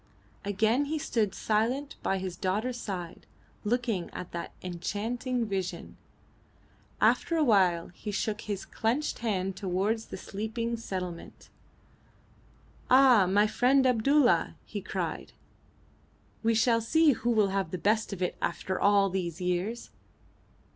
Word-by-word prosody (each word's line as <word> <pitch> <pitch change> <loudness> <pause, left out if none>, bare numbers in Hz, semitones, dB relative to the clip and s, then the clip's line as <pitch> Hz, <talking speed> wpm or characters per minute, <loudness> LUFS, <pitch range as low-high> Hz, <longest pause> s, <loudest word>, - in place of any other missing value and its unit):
Again 220 +7 +1
he 310 +2 -2
stood 215 -9 -1
silent 240 +7 0
by 195 - 0
his 185 -2 -4
daughter's 215 +7 -2
side 180 -5 -6 0.4
looking 225 -5 -1
at 180 - -7
that 170 - -5
enchanting 225 +7 -2
vision. 195 -4 -4 1.0
After 335 - +3
a 315 - +3
while 185 - +3
he 180 +4 -8
shook 210 +1 -2
his 205 -2 -4
clenched 245 +7 -1
hand 195 -4 -1
towards 195 +4 -1
the - - -7
sleeping 220 +5 -3
settlement. 185 -6 -6 1.4
"Ah! 255 -7 +6
my 205 +3 +4
friend 255 +5 +3
Abdulla," 255 +3 +3
he - - -5
cried, - - -4 1.1
"we 230 0 +2
shall 230 +1 +3
see 315 +7 +4
who 240 -2 -1
will 215 -4 +3
have 195 -3 -1
the 185 - -4
best 215 +4 +1
of 190 -2 -3
it 180 - -1
after 190 - -2
all 200 -1 +5
these 180 -3 -3
years!" 180 +6 -2
210 Hz, 130 wpm, -29 LUFS, 190-235 Hz, 1.4 s, Ah